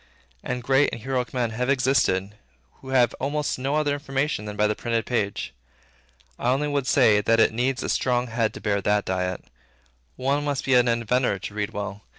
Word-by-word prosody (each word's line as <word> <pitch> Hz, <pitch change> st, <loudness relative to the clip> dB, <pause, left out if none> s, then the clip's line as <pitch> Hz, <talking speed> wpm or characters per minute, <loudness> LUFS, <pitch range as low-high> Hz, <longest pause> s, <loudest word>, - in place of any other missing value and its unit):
And 125 Hz, -1 st, -3 dB
great 135 Hz, +3 st, +3 dB
and -, -, -6 dB
heroic 130 Hz, -1 st, -2 dB
men 120 Hz, -3 st, -1 dB
have 125 Hz, +4 st, -2 dB
existed, 125 Hz, -8 st, +2 dB, 0.5 s
who 130 Hz, -, -10 dB
had 125 Hz, -2 st, +3 dB
almost 145 Hz, 0 st, -2 dB
no 135 Hz, +3 st, -1 dB
other 150 Hz, -2 st, +1 dB
information 140 Hz, -4 st, -2 dB
than 105 Hz, 0 st, -6 dB
by 105 Hz, +1 st, +2 dB
the 105 Hz, -, +2 dB
printed 115 Hz, +1 st, -2 dB
page. 100 Hz, -, -2 dB, 0.9 s
I 120 Hz, -, 0 dB
only 140 Hz, +4 st, +1 dB
would 140 Hz, -2 st, -1 dB
say, 110 Hz, -6 st, +4 dB
that 115 Hz, +2 st, +2 dB
it 115 Hz, -, +4 dB
needs 125 Hz, +3 st, -1 dB
a -, -, -3 dB
strong 125 Hz, -1 st, +1 dB
head 115 Hz, -2 st, -1 dB
to -, -, -8 dB
bear 100 Hz, -2 st, 0 dB
that 105 Hz, +1 st, +1 dB
diet. 90 Hz, -1 st, -2 dB, 0.7 s
One 140 Hz, +3 st, 0 dB
must 145 Hz, -2 st, -2 dB
be 135 Hz, -, +2 dB
an 125 Hz, -1 st, +5 dB
inventor 120 Hz, -1 st, +1 dB
to 100 Hz, -, -7 dB
read 105 Hz, -1 st, -2 dB
well. 105 Hz, 0 st, -5 dB
125 Hz, 195 wpm, -24 LUFS, 105-135 Hz, 0.9 s, an